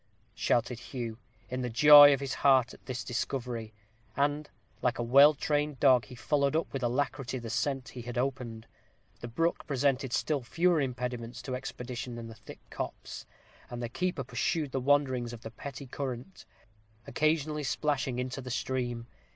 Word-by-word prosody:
shouted 120 0 0
Hugh, 120 -2 -6 0.3
in 125 0 -4
the 125 - -2
joy 145 +4 +9
of 140 -1 +1
his 135 -2 -3
heart 130 -3 +3
at - - -16
this 125 -2 -4
discovery; 120 -2 -3 0.5
and, 145 +1 0 0.3
like 125 0 +1
a 120 - -1
well 140 +5 +7
trained 145 -1 -1
dog, 130 -4 +5
he 125 - -11
followed 140 +3 +1
up 165 - -1
with 135 - -3
alacrity 130 +1 -1
the 115 -2 -6
scent 130 +1 -1
he 125 - -8
had 120 +1 -6
opened. 125 -4 -3 0.5
The 120 - -6
brook 165 +9 -1
presented 135 -2 0
still 145 +2 0
fewer 170 +6 +2
impediments 125 -2 -4
to 130 +1 -3
expedition 125 -1 -6
than 115 -1 -7
the 115 - -9
thick - - -14
copse, - - -6 0.4
and 120 - -6
the 120 -1 -4
keeper 175 +1 -2
pursued 130 +4 -1
the 135 - -1
wanderings 130 -3 +1
of 115 - -9
the 110 - -8
petty 140 +4 -8
current, 130 +5 -6 0.6
occasionally 155 -1 0
splashing 135 -2 -1
into 125 +2 -3
the 125 - -8
stream. 120 -2 -2
130 Hz, 165 wpm, -30 LUFS, 120-145 Hz, 0.6 s, joy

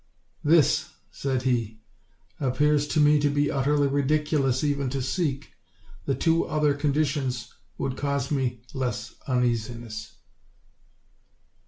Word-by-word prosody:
"This," 155 -2 +3 0.2
said 130 -2 -2
he, 115 -4 0 0.6
"appears 145 +2 +2
to 155 - 0
me 150 0 +5
to 145 0 +2
be 145 0 +1
ut 135 -1 -1
terly 145 -1 +3
ridiculous 140 -1 +1
even 140 -2 0
to 135 +2 -2
seek; 135 +1 -2 0.6
the 135 - +1
two 165 0 +2
other 150 -2 +2
conditions 140 -4 -1 0.2
would 135 - -3
cause 140 -1 -1
me 125 -4 -1
less 120 -5 -3
uneasiness." 120 -3 -2
140 Hz, 120 wpm, -26 LUFS, 125-145 Hz, 0.6 s, me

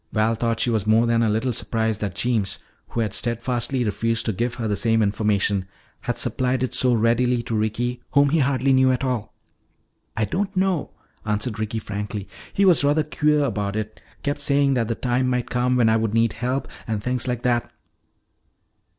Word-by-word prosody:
Val 110 +1 +2
thought 115 0 -1
she 120 - +1
was 110 -3 -1
more 110 +2 +4
than 115 0 +2
a 115 - +2
little 115 +4 0
surprised 110 -1 -1
that 100 -3 -3
Jeems, 115 -6 0 0.3
who 115 - -2
had 105 -3 -2
steadfastly 120 +2 -1
refused 115 +1 0
to 110 - 0
give 120 +5 -2
her 115 -2 -3
the 105 - 0
same 115 +1 +2
information, 100 -2 +1 0.3
had - - -3
supplied 130 0 0
it 130 - -2
so 125 - +3
readily 120 +2 +2
to 115 - -3
Ricky 120 +3 -1
whom 140 0 +5
he 160 +3 +2
hardly 135 -1 +2
knew 130 0 +4
at 130 +1 -1
all. 125 -5 -2 0.8
"I 110 - +2
don't 190 - -2
know," 185 -5 +1 0.3
answered 105 +1 -2
Ricky 110 +1 -2
frankly. 105 -1 -5 0.2
"He 200 - +2
was 175 -6 +5
rather 145 +2 +3
queer 150 -1 +1
about 105 -6 -2
it. 110 0 -5 0.2
Kept 145 0 -1
saying 140 -1 +3
that 120 -4 0
the 115 - -1
time 125 +1 0
might 125 -1 -1
come 125 +1 +1
when 120 -2 +4
I 110 0 +4
would 110 -1 -1
need 115 -1 +2
help, 125 +4 -2 0.2
and 110 -3 -2
things 125 0 -1
like 125 -1 -2
that." 120 -1 +1
115 Hz, 195 wpm, -23 LUFS, 110-130 Hz, 0.8 s, whom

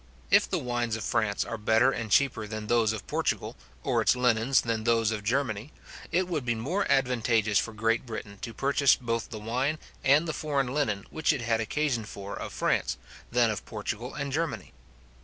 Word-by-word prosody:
If - - +5
the - - 0
wines 120 -2 -1
of 110 - -5
France 100 -1 0
are 115 - -5
better 110 +5 +4
and 115 -4 -4
cheaper 115 -1 +2
than 110 0 -5
those 115 -1 +3
of 110 - -5
Portugal, - - -1 0.3
or - - +1
its - - +4
linens 125 +1 +3
than 115 -2 -2
those 115 -1 +2
of 105 -2 -3
Germany, 120 +1 -1 0.4
it 180 +2 +1
would 160 -6 -2
be 120 -1 0
more 150 - -1
advantageous 115 -5 +2
for 110 - -3
Great 115 +2 0
Britain 100 -3 -7
to 115 - -5
purchase 140 +3 +3
both 115 -2 -3
the 110 - -6
wine 125 +8 -1 0.3
and 145 +5 +4
the 160 - -2
foreign 140 -5 -1
linen 105 -10 0
which 160 - +2
it 135 - -2
had 115 -1 +1
occasion 130 0 0
for 100 0 -7
of - - -6
France, - - 0 0.3
than 120 -2 +3
of 105 - -4
Portugal 110 +3 -5
and 140 -1 -3
Germany. 145 - -2
115 Hz, 195 wpm, -28 LUFS, 110-135 Hz, 0.4 s, If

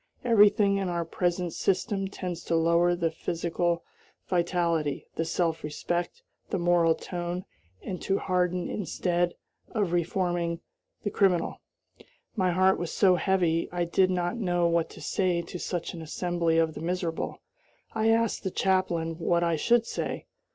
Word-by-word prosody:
Everything 205 -3 +5
in 195 -2 -1
our 170 -1 -1
present 175 0 -1
system 195 +1 0
tends 180 -3 -5
to 165 - 0
lower 170 +2 +3
the 170 -2 0
physical 170 +1 -1 0.4
vitality, 170 -4 0
the 165 - -1
self 165 0 -1
respect, 175 - -3 0.3
the 195 - 0
moral 170 -2 +3
tone, 175 0 -4 0.4
and 180 -2 -5
to 195 - +1
harden 180 -1 0
instead 175 -3 -1 0.3
of 205 -6 -1
reforming 175 -1 0 0.4
the 205 - -1
criminal. 180 -4 +1 0.7
My 185 -4 +2
heart 185 +2 +3
was 175 -1 -3
so 190 -3 +4
heavy 175 -2 +1
I 175 0 0
did 185 +2 +3
not 180 +3 -1
know 175 -5 +1
what 170 -1 +1
to - - -12
say 180 -3 0
to 175 +1 -7
such 175 -1 -3
an 170 - -7
assembly 170 +1 0
of 160 -1 +2
the - - -7
miserable. 170 -1 -2 0.5
I 220 0 +2
asked 230 -1 +2
the 190 - -1
chaplain 175 -4 0
what 170 +1 +2
I 170 -1 +2
should 235 +9 +3
say. - - -4
175 Hz, 150 wpm, -28 LUFS, 170-190 Hz, 0.7 s, Everything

